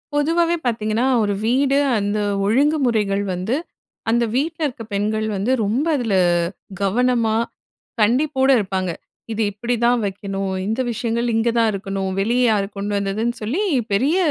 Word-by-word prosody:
பொதுவாவே 335 Hz, +3 st, +2 dB
பாத்தீங்கன்னா, 225 Hz, +1 st, 0 dB, 0.2 s
ஒரு 205 Hz, -1 st, 0 dB
வீடு 270 Hz, +3 st, +2 dB, 0.2 s
அந்த 205 Hz, +1 st, -1 dB, 0.3 s
ஒழுங்குமுறைகள் 230 Hz, -5 st, +2 dB
வந்து, 185 Hz, +8 st, -1 dB, 0.5 s
அந்த 235 Hz, +1 st, +3 dB
வீட்டுல 320 Hz, +5 st, -1 dB
இருக்க 245 Hz, -4 st, -7 dB
பெண்கள் 215 Hz, +2 st, 0 dB
வந்து, 200 Hz, +6 st, 0 dB
ரொம்ப 235 Hz, +9 st, 0 dB
அதுல 225 Hz, -6 st, 0 dB, 0.7 s
கவனமா, 230 Hz, +2 st, +2 dB, 0.7 s
கண்டிப்போட 265 Hz, +4 st, +2 dB
இருப்பாங்க. 190 Hz, -3 st, -2 dB, 0.4 s
இது 220 Hz, 0 st, -2 dB
இப்படிதான் 240 Hz, +3 st, +1 dB
வைக்கணும், 195 Hz, 0 st, -3 dB
இந்த 225 Hz, +4 st, 0 dB
விஷயங்கள் 235 Hz, +1 st, -1 dB
இங்க 225 Hz, +1 st, +2 dB
தான் 225 Hz, -1 st, +4 dB
இருக்கணும். 195 Hz, -1 st, -3 dB
வெளிய 235 Hz, +5 st, +1 dB
யாரு 200 Hz, -2 st, +1 dB
கொண்டு 205 Hz, +1 st, -3 dB
வந்ததுன்னு 210 Hz, +4 st, -1 dB
சொல்லி, 280 Hz, -, -1 dB, 0.3 s
பெரிய 275 Hz, -, +2 dB
225 Hz, 130 wpm, -21 LUFS, 200-250 Hz, 0.7 s, தான்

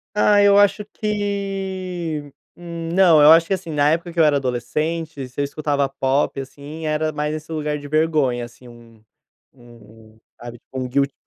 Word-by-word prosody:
Ai, 205 Hz, -1 st, +4 dB
eu 200 Hz, 0 st, +6 dB
acho 205 Hz, +1 st, +3 dB
que, 190 Hz, -7 st, -4 dB, 0.2 s
hum 170 Hz, -1 st, -7 dB
não. 175 Hz, -5 st, +6 dB
Eu 150 Hz, +2 st, +8 dB
acho 165 Hz, 0 st, +6 dB
que, 195 Hz, -, 0 dB
assim, 185 Hz, -3 st, -4 dB
na 145 Hz, 0 st, +2 dB
época 170 Hz, +1 st, -2 dB
que 170 Hz, -, -5 dB
eu -, -, +6 dB
era 145 Hz, -1 st, +3 dB
adolescente, 140 Hz, +3 st, -3 dB
se 125 Hz, -, -10 dB
eu -, -, +2 dB
escutava 140 Hz, -1 st, -1 dB
pop, 135 Hz, +1 st, -1 dB
assim, 145 Hz, +4 st, -9 dB
era 155 Hz, 0 st, -1 dB
mais 150 Hz, +1 st, -2 dB
esse 155 Hz, +1 st, -7 dB
lugar 150 Hz, -1 st, -2 dB
de 145 Hz, -, -9 dB
vergonha, 150 Hz, -6 st, +1 dB
assim, 120 Hz, +1 st, -12 dB
um 115 Hz, -2 st, -17 dB, 0.5 s
um, 115 Hz, -3 st, -18 dB, 0.2 s
sabe, 120 Hz, -1 st, -9 dB
tipo 130 Hz, -, -9 dB
um 130 Hz, -, -3 dB
guilty, 140 Hz, +2 st, 0 dB
150 Hz, 180 wpm, -21 LUFS, 135-170 Hz, 0.5 s, Eu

